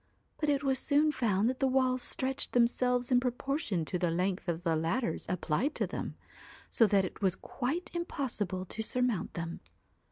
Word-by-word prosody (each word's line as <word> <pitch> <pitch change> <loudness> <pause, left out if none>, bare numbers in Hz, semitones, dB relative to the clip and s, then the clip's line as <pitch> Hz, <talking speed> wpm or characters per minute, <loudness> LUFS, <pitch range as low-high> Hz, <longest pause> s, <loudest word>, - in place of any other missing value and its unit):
But 300 - +1
it 285 -1 +2
was 265 -2 +1
soon 295 +2 +3
found 215 -6 +1
that 255 +1 -1
the 270 - +3
walls 255 -1 +2
stretched 265 +2 -2
themselves 245 +1 +2
in 250 - +6
proportion 250 - -1
to 180 - -2
the 175 -1 +1
length 180 +3 -1
of 170 0 -2
the 165 -2 +2
ladders 170 +10 -1
applied 180 - 0
to - - +1
them, - - -5 0.6
so 225 - +5
that 195 -2 +3
it 185 - -8
was 190 -3 +2
quite 310 +9 -3
impossible 225 - -2
to 215 - -4
surmount 245 -2 0
them. 165 0 -4
245 Hz, 180 wpm, -31 LUFS, 185-265 Hz, 0.6 s, in